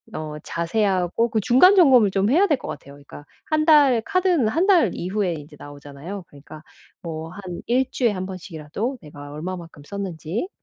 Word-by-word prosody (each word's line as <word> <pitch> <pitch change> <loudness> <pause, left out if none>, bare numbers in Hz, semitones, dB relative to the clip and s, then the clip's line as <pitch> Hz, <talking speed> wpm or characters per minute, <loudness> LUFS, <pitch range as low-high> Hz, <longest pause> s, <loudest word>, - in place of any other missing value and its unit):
어 155 -1 -5
자세하고 185 +4 0
그 220 - +1
중간 265 - +6
점검을 255 - +6
좀 195 +2 +1
해야 345 +10 +4
될 295 -5 +2
것 - - -8
같아요. 140 - -8
그러니까 145 +1 -13 0.2
1 310 0 0
달에 285 -7 +5
카드는 360 - +1
1 335 - +1
달 345 - +4
이후에 185 0 -2
인제 150 -1 -10
나오잖아요. 145 +6 -9
그러니까 150 +2 -14 0.4
뭐 160 -1 -6
한 185 -2 -8
1 255 +2 +1
주에 240 -4 +1
1 185 -2 -4
번씩이라도 185 - -6
내가 145 -2 -11
얼마만큼 165 -1 -7
썼는지 195 - -5
190 Hz, 345 characters per minute, -22 LUFS, 160-250 Hz, 0.4 s, 중간